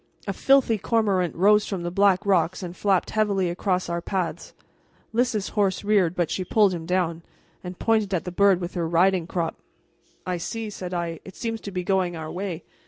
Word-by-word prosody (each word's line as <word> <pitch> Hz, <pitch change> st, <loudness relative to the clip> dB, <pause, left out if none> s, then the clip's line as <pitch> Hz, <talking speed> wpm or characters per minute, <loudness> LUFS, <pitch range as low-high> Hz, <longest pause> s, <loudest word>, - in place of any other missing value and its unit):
A 195 Hz, -, -2 dB
filthy 260 Hz, -1 st, +3 dB
cormorant 195 Hz, -6 st, +1 dB
rose 210 Hz, +4 st, +4 dB
from 190 Hz, -4 st, -4 dB
the 175 Hz, -, -3 dB
black 195 Hz, +1 st, +3 dB
rocks 190 Hz, -1 st, +1 dB
and 175 Hz, 0 st, -6 dB
flapped 195 Hz, -2 st, +1 dB
heavily 200 Hz, -5 st, +1 dB
across 180 Hz, 0 st, -1 dB
our 170 Hz, 0 st, -2 dB
path. 185 Hz, -2 st, -3 dB, 0.6 s
Lys's 230 Hz, -4 st, 0 dB
horse 200 Hz, -3 st, 0 dB
reared, 200 Hz, -5 st, +2 dB
but 175 Hz, -3 st, 0 dB
she 185 Hz, -, -1 dB
pulled 200 Hz, +1 st, +3 dB
him 165 Hz, -2 st, -6 dB
down, 175 Hz, -2 st, 0 dB, 0.4 s
and 180 Hz, 0 st, -7 dB
pointed 220 Hz, -3 st, +1 dB
at 180 Hz, -4 st, 0 dB
the 180 Hz, -, -5 dB
bird 195 Hz, 0 st, +4 dB
with 175 Hz, 0 st, -5 dB
her 170 Hz, -3 st, -1 dB
riding 175 Hz, +1 st, +2 dB
crop. 170 Hz, -3 st, -2 dB, 0.7 s
"I 180 Hz, -1 st, -2 dB
see," 220 Hz, +5 st, -5 dB
said 180 Hz, -3 st, -6 dB
I; 170 Hz, -2 st, -3 dB
"it 190 Hz, -, -12 dB
seems 225 Hz, -2 st, -4 dB
to 200 Hz, -, -7 dB
be 180 Hz, -1 st, -3 dB
going 185 Hz, -2 st, 0 dB
our 160 Hz, -1 st, -6 dB
way. 180 Hz, -2 st, -4 dB
185 Hz, 195 wpm, -24 LUFS, 175-205 Hz, 0.7 s, rose